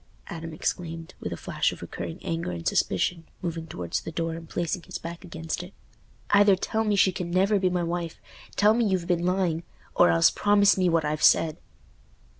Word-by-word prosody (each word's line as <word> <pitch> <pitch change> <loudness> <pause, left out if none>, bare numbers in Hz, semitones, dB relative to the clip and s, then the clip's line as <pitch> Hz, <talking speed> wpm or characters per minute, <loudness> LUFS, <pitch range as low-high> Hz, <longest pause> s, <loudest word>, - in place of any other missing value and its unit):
Adam 165 -3 -6
exclaimed, 165 +1 -4
with - - -5
a - - -4
flash - - 0
of - - -9
recurring 85 -2 -6
anger 165 - -2
and 85 -2 -5
suspicion, 170 - +1 0.2
moving 165 -2 -3
towards 90 - -3
the - - -7
door 165 0 -2
and 165 -1 -9
placing 175 +1 -2
his 185 +1 -7
back 170 +2 -8
against 165 -1 -5
it. 180 +2 -11 0.6
"Either 205 -1 +6
tell 220 +4 -1
me 210 -2 +1
she 195 -1 +4
can 180 -1 -4
never 195 +3 +3
be 185 -1 +2
my 180 -1 0
wife—tell 175 +4 -1
me 235 +1 +2
you've 190 -4 0
been 175 -1 0
lying—or 175 - 0
else 85 0 +5
promise 205 -1 +4
me 185 -2 +2
what 165 -2 +2
I've 150 +1 -2
said." 155 -2 +4
170 Hz, 190 wpm, -26 LUFS, 165-185 Hz, 0.6 s, Either